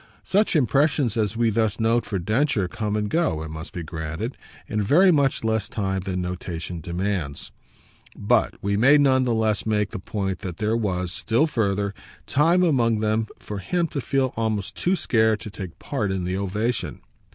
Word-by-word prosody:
Such 205 -1 +2
impressions 140 -3 +2
as 110 -1 0
we 115 -1 +2
thus 110 0 0
note 115 +1 +2
for 105 -2 -2
Densher 110 - +1
come 105 0 -3
and 105 -1 0
go, 160 - 0
it 80 - -7
must 80 +3 -7
be 85 - -5
granted, 80 - -5 0.3
in 105 0 -1
very 175 - +5
much 140 -6 +2
less 110 -1 0
time 95 -4 -1
than 95 -1 -3
notation 90 -1 -5
demands; 85 -3 -3 0.6
but 110 +2 +1
we 100 0 +1
may 135 +8 +6
none 130 -2 +4
the 120 - +1
less 110 -2 +1
make 105 -2 0
the - - -5
point 95 -1 -3
that 90 -3 -6
there 110 +1 0
was, 90 -5 -1
still 115 - +1
further, 100 -8 0 0.3
time 165 +6 +3
among 120 -9 +2
them 110 +1 0
for 105 -1 -6
him 175 - 0
to 140 - -3
feel 135 0 0
almost 110 -3 -2
too 180 +2 +1
scared 110 - +2
to 105 - -7
take 95 -4 -8
part 110 -8 -2
in 95 -1 -2
the 90 +1 -2
ovation. 105 +5 -2
110 Hz, 185 wpm, -24 LUFS, 95-120 Hz, 0.6 s, may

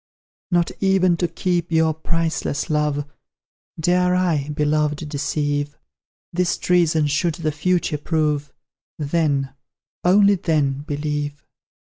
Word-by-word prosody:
Not 175 -2 +2
even 190 -2 +3
to 175 - 0
keep 175 0 -1
your 160 -1 +3
priceless 160 -2 -2
love, 150 -1 0 0.7
Dare 180 +2 +2
I, 165 -6 +1
Beloved, 150 0 0
deceive; 145 0 -2 0.6
This 180 0 +1
treason 165 -4 +2
should 155 +3 0
the 155 -2 -2
future 165 0 0
prove, 150 -2 -1 0.5
Then, 145 -3 0 0.5
only 200 +3 +5
then, 150 -7 0
believe! 145 0 -3
155 Hz, 105 wpm, -21 LUFS, 145-175 Hz, 0.7 s, only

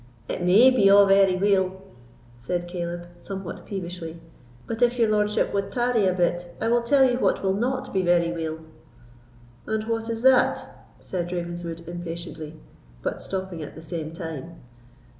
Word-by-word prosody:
"It - - -4
may 200 +9 +6
be 225 -6 +4
a' 200 0 +8
very 195 -1 +5
weel," 190 -1 +1 0.6
said 175 +9 -3
Caleb, 175 -1 -4
somewhat 190 0 -7
peevishly; 175 -4 -6 0.5
"but 230 +1 -5
if 245 0 +3
your 230 -2 +4
lordship 210 0 +1
wad 200 -1 -1
tarry 240 -4 +2
a 185 - +2
bit, 175 -1 -1
I 225 - 0
will 240 0 +3
tell 270 +3 +4
you 245 0 0
what - - +1
will 190 -1 +2
not 255 +5 -2
be 190 - +2
very 175 -1 +2
weel." 160 -1 -4 1.1
"And 220 0 -1
what 225 0 -2
is 230 0 -3
that?" 260 -1 +2
said 175 -2 -4
Ravenswood, 170 -1 -5
impatiently, 170 -2 -7 0.4
but - - -3
stopping 190 -3 -4
at 150 - -8
the 160 - -10
same 160 -1 -5
time. 165 -1 -7
185 Hz, 160 wpm, -25 LUFS, 170-215 Hz, 1.1 s, a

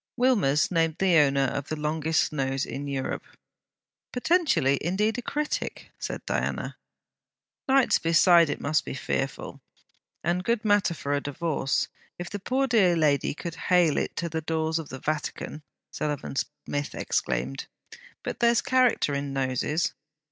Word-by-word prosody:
Wilmers 205 - +3
named 165 -2 +2
the 190 -2 +3
owner 140 -2 +4
of 140 +1 -2
the 155 - -3
longest 155 +1 0
nose 135 -2 -1
in 140 +1 -5
Europe. 135 -2 -3 0.9
'Potentially, 260 - +2
indeed 210 +8 0
a - - -4
critic!' 300 +4 -3
said - - -5
Diana. - - -2 0.9
'Nights 265 -1 +4
beside 165 0 +5
it 145 - -2
must 155 +2 +1
be - - -6
fearful, - - -3 0.6
and 175 +1 0
good 230 +1 0
matter 205 -4 +3
for 145 -2 -3
a 145 - +1
divorce, 145 -1 -1 0.3
if 175 0 -6
the 205 - -4
poor 260 +7 0
dear 210 -9 +4
lady 145 -3 +2
could 170 +1 -5 0.2
hale 175 -4 +4
it - - -1
to 170 - -2
the 160 -1 -3
doors 160 0 -1
of 155 - -7
the 130 - -6
Vatican!' 155 +1 -4 0.3
Sullivan 150 -3 -3
Smith 145 +1 -3
exclaimed. 65 +2 -2 0.6
'But - - -4
there's 235 -1 +3
character 255 - +3
in 140 0 -3
noses.' 135 +4 0
160 Hz, 150 wpm, -27 LUFS, 145-200 Hz, 0.9 s, beside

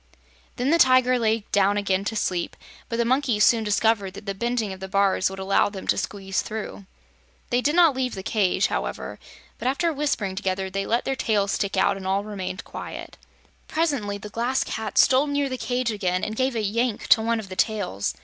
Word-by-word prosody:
Then 255 +3 0
the 335 - +4
Tiger 255 -2 +5
lay 220 -2 +1
down 200 0 +3
again 195 -1 0
to 225 - -2
sleep, 180 -4 -1 0.3
but 230 - -2
the 235 - +1
monkeys 250 -4 +2
soon 230 0 +4
discovered 210 -2 +1
that 205 - -10
the 200 - -2
bending 230 -1 -1
of 190 - -10
the 190 - -6
bars 195 -1 +2
would 190 - -8
allow 190 +1 +2
them 195 -2 -8
to - - +2
squeeze 195 -2 -2
through. 215 -2 -6 0.6
They 245 +1 +2
did 295 +5 +1
not 335 -6 +5
leave 255 -2 -1
the 190 - -6
cage, 200 -3 +1
however, - - -3 0.4
but 240 - -2
after 320 +5 +1
whispering 275 -10 -1
together 190 0 -2
they 195 0 -2
let 235 +2 +1
their 270 - 0
tails 205 -5 +1
stick 200 -1 -1
out 190 +1 +3
and 190 -1 -6
all 195 +1 +1
remained 195 -3 -5
quiet. - - -8 0.5
Presently 280 -11 -1
the 210 +1 -9
Glass 240 +5 0
Cat 220 -2 -5
stole 265 +2 +5
near 285 -1 0
the 255 - -3
cage 245 -1 -1
again 185 -4 -1
and 215 - -2
gave 260 +1 0
a 220 - -1
yank 230 +2 -1
to 220 - +7
one 230 +1 0
of 205 -3 -8
the 185 - -6
tails. 200 - -1
215 Hz, 210 wpm, -24 LUFS, 195-250 Hz, 0.6 s, to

